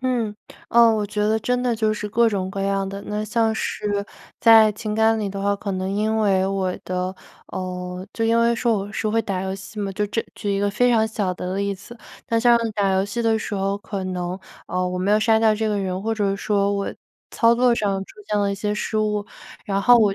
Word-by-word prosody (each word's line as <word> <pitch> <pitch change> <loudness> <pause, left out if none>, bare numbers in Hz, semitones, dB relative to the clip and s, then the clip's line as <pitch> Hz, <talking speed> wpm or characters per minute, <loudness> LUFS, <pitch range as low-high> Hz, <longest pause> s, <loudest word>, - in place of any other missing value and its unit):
嗯， 240 -5 -1 0.3
呃， 235 -1 +6
我 210 -1 0
觉 210 +1 -4
得 220 +1 +2
真 250 +1 0
的 245 -2 +1
就 215 -1 +1
是 210 0 -4
各 230 +2 +3
种 190 -3 -2
各 195 0 -4
样 195 0 0
的。 200 +1 -6
那 210 +1 -2
像 225 +1 +1
是 205 -2 -2 0.3
在 225 -2 +7
情 210 +1 -4
感 220 0 +3
里 205 -2 -2
的 195 0 -5
话， 200 0 +1
可 200 -1 -4
能 185 0 -2
因 215 +2 0
为 195 -3 +2
我 190 -1 -1
的 185 0 -2 0.3
呃， 180 0 -5
就 225 - -1
因 230 +1 +3
为 235 0 +3
说 235 -1 +1
我 200 +1 -6
是 215 - -1
会 225 +2 +2
打 190 -4 -3
游 190 - -3
戏 205 +2 -8
嘛。 200 - -2
就 210 +2 -1
这 225 +2 -2
举 200 -1 -2
一 195 - 0
个 205 - +1
非 245 +5 +2
常 220 -2 +3
小 205 -4 -2
的 185 +1 -4
例 200 0 -1
子， 225 +5 -13 0.3
那 230 - +2
像 235 +1 +5 0.2
打 195 -2 +2
游 190 +1 +2
戏 210 +4 -4
的 225 -1 +2
时 210 -1 -4
候， 195 +1 0
可 195 -2 -5
能， 180 0 -3 0.3
呃， 180 +1 -1
我 180 0 -3
没 190 +3 0
有 210 - +5
杀 220 0 +3
掉 220 -1 +5
这 220 +1 -1
个 210 - 0
人， 185 -1 -2
或 225 +2 -1
者 200 -2 0
说 200 0 +1
我 200 0 -2 0.4
操 230 0 +4
作 245 0 +4
上 200 -3 0
出 - - -16
现 210 - 0
了 200 0 +1
一 200 - -1
些 210 +1 -2
失 215 - -3
误， 210 -1 0 0.4
然 195 0 0
后 245 +2 +7
我 205 -3 +3
205 Hz, 260 characters per minute, -22 LUFS, 195-220 Hz, 0.4 s, 在